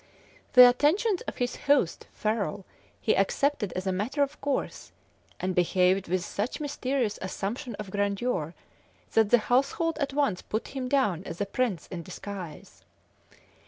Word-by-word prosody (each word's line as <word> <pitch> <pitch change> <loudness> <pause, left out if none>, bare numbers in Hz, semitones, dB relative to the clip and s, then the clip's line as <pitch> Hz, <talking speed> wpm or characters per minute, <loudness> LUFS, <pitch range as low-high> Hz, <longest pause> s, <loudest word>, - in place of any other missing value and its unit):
The 250 -1 +11
attentions 335 - +2
of - - -5
his 245 0 -1
host, 280 - +1
Ferrol, 210 -2 -2 0.3
he - - +2
accepted 280 - +1
as 185 - -4
a 190 - +1
matter 235 +10 0
of 280 +1 -5
course, 280 -1 -3 0.5
and 185 0 -1
behaved 180 +2 +2
with 180 +1 -1
such 215 +9 -3
mysterious 265 -6 -1
assumption 210 +6 -4
of 205 -2 -7
grandeur, 200 -4 -1 0.6
that 220 -2 +3
the 245 - +7
household 275 +8 +1
at 280 - -1
once 275 -10 0
put 220 - -4
him 260 -2 -4
down 210 - +1
as 170 -1 -7
a 205 - 0
prince 200 -5 -1
in 175 - -4
disguise. 170 - -9
215 Hz, 150 wpm, -28 LUFS, 190-275 Hz, 0.6 s, The